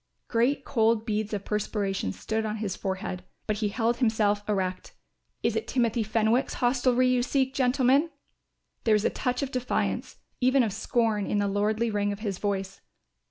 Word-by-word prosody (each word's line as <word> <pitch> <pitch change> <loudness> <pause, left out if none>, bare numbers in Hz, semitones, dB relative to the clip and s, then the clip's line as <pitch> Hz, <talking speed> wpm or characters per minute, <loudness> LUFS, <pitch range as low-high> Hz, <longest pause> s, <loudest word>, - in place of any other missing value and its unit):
Great 255 +4 +1
cold 225 -2 +2
beads 215 -1 -1
of 200 -2 -3
perspiration 200 - -1
stood 220 - -2
on 215 -1 -2
his 210 -3 -3
forehead, 190 -1 -4 0.2
but 215 -1 -1
he 210 0 0
held 235 +2 0
himself 215 -4 +2
erect. 185 -3 -2 0.5
"Is - - +1
it - - -2
Timothy 235 -2 +1
Fenwick's 220 +3 +1
hostelry 250 0 +2
you 255 -1 +3
seek, 265 +1 0
gentlemen?" 265 +4 +3 0.7
There 220 -2 +4
was 210 - +1
a - - +2
touch 250 0 -1
of 275 - -3
defiance, 250 -1 -2 0.2
even 260 +1 +4
of 215 -4 -1
scorn, 220 -1 0
in - - 0
the 205 0 +1
lordly 215 +3 0
ring 205 -1 0
of 200 +1 -6
his 200 -4 -3
voice. 195 -1 -3
220 Hz, 170 wpm, -27 LUFS, 205-245 Hz, 0.7 s, There